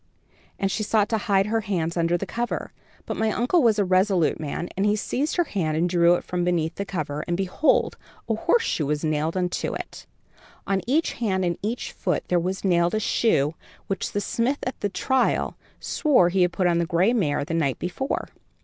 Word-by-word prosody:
and 195 Hz, -1 st, 0 dB
she 215 Hz, -, -2 dB
sought 210 Hz, -1 st, +2 dB
to 220 Hz, 0 st, 0 dB
hide 200 Hz, -3 st, +2 dB
her 225 Hz, +1 st, 0 dB
hands 175 Hz, -6 st, -2 dB
under 170 Hz, 0 st, +1 dB
the 195 Hz, -, -4 dB
cover; 235 Hz, +5 st, -3 dB, 0.3 s
but -, -, -3 dB
my 220 Hz, 0 st, +1 dB
uncle 245 Hz, -, +2 dB
was 225 Hz, -4 st, +4 dB
a 205 Hz, -, +2 dB
resolute 185 Hz, -2 st, +2 dB
man, 155 Hz, +3 st, -4 dB
and 195 Hz, +2 st, +1 dB
he 210 Hz, -, +3 dB
seized 270 Hz, +7 st, -2 dB
her 350 Hz, -, +3 dB
hand 165 Hz, -, -2 dB
and 170 Hz, +2 st, +2 dB
drew 175 Hz, 0 st, +4 dB
it -, -, -4 dB
from 180 Hz, -1 st, -2 dB
beneath 170 Hz, -2 st, 0 dB
the 200 Hz, -, -4 dB
cover, 155 Hz, -6 st, -3 dB
and 175 Hz, 0 st, 0 dB
behold, 195 Hz, -, +1 dB, 0.3 s
a -, -, +1 dB
horseshoe 455 Hz, -, +1 dB
was 150 Hz, +1 st, -1 dB
nailed 155 Hz, +3 st, 0 dB
unto 180 Hz, -1 st, -1 dB
it. -, -, -8 dB, 0.6 s
On 195 Hz, -1 st, 0 dB
each 305 Hz, +6 st, +1 dB
hand 190 Hz, -5 st, -1 dB
and 170 Hz, -1 st, 0 dB
each 225 Hz, +4 st, -3 dB
foot -, -, -1 dB
there 180 Hz, -, +3 dB
was 185 Hz, +3 st, -3 dB
nailed 175 Hz, 0 st, +2 dB
a -, -, +1 dB
shoe 160 Hz, -9 st, +2 dB, 0.3 s
which 195 Hz, -, -3 dB
the 205 Hz, -, 0 dB
smith 235 Hz, +7 st, 0 dB
at 255 Hz, -, -4 dB
the 205 Hz, -, -1 dB
trial 255 Hz, +7 st, 0 dB, 0.2 s
swore 265 Hz, -, +3 dB
he 185 Hz, +1 st, +1 dB
had 180 Hz, 0 st, +3 dB
put 185 Hz, +1 st, -1 dB
on 170 Hz, -1 st, +3 dB
the 170 Hz, -, 0 dB
gray 185 Hz, +6 st, +2 dB
mare 150 Hz, -11 st, 0 dB
the 165 Hz, -, -4 dB
night 145 Hz, -5 st, 0 dB
before." 180 Hz, -, -3 dB
190 Hz, 210 wpm, -24 LUFS, 170-215 Hz, 0.6 s, was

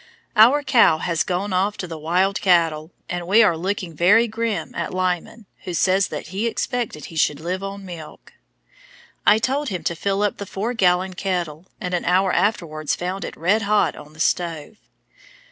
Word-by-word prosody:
Our 245 Hz, +7 st, +6 dB
cow 230 Hz, -, +5 dB
has 165 Hz, 0 st, -1 dB
gone 185 Hz, +2 st, -1 dB
off 195 Hz, +3 st, 0 dB
to -, -, -4 dB
the 165 Hz, -, -6 dB
wild 180 Hz, +5 st, +1 dB
cattle, 165 Hz, -4 st, +2 dB, 0.2 s
and 175 Hz, -1 st, -4 dB
we 215 Hz, +5 st, +6 dB
are 175 Hz, -6 st, +3 dB
looking 185 Hz, 0 st, -3 dB
very 205 Hz, +9 st, +4 dB
grim 225 Hz, -1 st, -3 dB
at -, -, -4 dB
Lyman, 185 Hz, +4 st, -2 dB, 0.2 s
who 180 Hz, -, -4 dB
says 190 Hz, +2 st, +2 dB
that 155 Hz, +1 st, -7 dB
he 200 Hz, +6 st, -2 dB
expected 230 Hz, -, -3 dB
he 165 Hz, -, -11 dB
should 150 Hz, -2 st, +1 dB
live 180 Hz, +4 st, -3 dB
on 195 Hz, 0 st, -6 dB
milk. 170 Hz, -4 st, -10 dB, 0.9 s
I 210 Hz, -, +7 dB
told 270 Hz, +5 st, -1 dB
him 180 Hz, -5 st, -4 dB
to 170 Hz, -, -1 dB
fill 200 Hz, +4 st, -1 dB
up 205 Hz, -, 0 dB
the 200 Hz, -, -7 dB
four 215 Hz, +7 st, -3 dB
gallon 185 Hz, -3 st, +2 dB
kettle, 180 Hz, -3 st, -3 dB
and 180 Hz, -3 st, -4 dB
an 180 Hz, -, -1 dB
hour 185 Hz, +2 st, +2 dB
afterwards 160 Hz, -8 st, 0 dB
found 185 Hz, +2 st, -4 dB
it -, -, -7 dB
red 190 Hz, +7 st, +2 dB
hot 210 Hz, 0 st, +2 dB
on 150 Hz, 0 st, -13 dB
the 155 Hz, -, -17 dB
stove. 170 Hz, +3 st, -1 dB
185 Hz, 185 wpm, -22 LUFS, 170-205 Hz, 0.9 s, I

